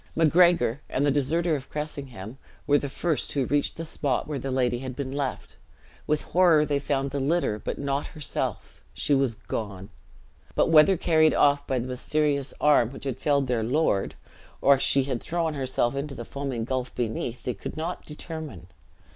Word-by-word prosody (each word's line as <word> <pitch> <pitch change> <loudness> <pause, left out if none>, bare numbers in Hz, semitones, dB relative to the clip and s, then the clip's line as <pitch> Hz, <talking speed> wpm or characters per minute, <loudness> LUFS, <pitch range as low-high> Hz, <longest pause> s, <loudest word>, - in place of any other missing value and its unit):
Macgregor, 165 -5 +4
and 140 - 0
the 145 - +3
deserter 160 +5 +1
of 135 -2 -7
Cressingham, 135 -7 -6 0.3
were 145 0 +4
the 140 - -4
first 160 +2 -1
who 140 -3 +1
reached 145 +2 0
the 165 - -4
spot 140 -4 -1
where 150 -2 -3
the 135 - -4
lady 125 -2 +1
had 130 -1 -6
been 135 -1 -4
left; 140 -1 -4 0.5
with 150 0 +1
horror 170 -4 +4
they 145 -1 0
found 140 -1 -1
the 140 - -2
litter, 140 -6 0
but - - -4
not 140 0 -2
herself. 150 -2 -4
She 145 - 0
was 135 -4 +2
gone. 100 -3 -5 0.7
But - - +3
whether 165 +4 +6
carried 155 -1 +3
off 145 0 +3
by 130 - 0
the 120 - -2
mysterious 140 +2 0
arm 145 -6 +4
which 135 - -10
had 130 -2 -3
felled 140 -1 +2
their 125 -3 0
lord, 120 -4 +1 0.4
or 140 -1 +5
she 135 0 +3
had 130 -3 -3
thrown 165 -1 -1
herself 130 -2 0
into 140 0 -4
the 120 -1 -7
foaming 135 -4 -4
gulf 130 0 -3
beneath, 120 +1 -3
they 125 - -2
could 100 - -8
not 165 +3 -4
determine. 150 - -8
140 Hz, 180 wpm, -26 LUFS, 130-150 Hz, 0.7 s, whether